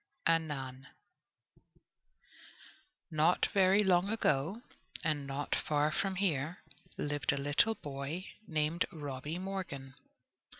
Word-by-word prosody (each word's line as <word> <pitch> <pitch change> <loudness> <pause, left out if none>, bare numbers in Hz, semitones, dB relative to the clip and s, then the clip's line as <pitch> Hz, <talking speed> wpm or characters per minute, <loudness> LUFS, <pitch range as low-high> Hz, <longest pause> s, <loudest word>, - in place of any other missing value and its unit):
ANNAN 140 -5 0 2.2
Not 155 +3 +4
very 195 +1 +5
long 185 0 +4
ago, 200 - +1 0.4
and 145 -3 0
not 140 +1 -2
far 150 0 +2
from 190 +3 0
here, 170 -4 0 0.3
lived 145 -1 0
a - - -1
little 145 +11 +2
boy 145 +2 -5 0.2
named 155 +2 +1
Robby 145 +1 -5
Morgan. 180 -8 -5
155 Hz, 95 wpm, -33 LUFS, 140-185 Hz, 2.2 s, very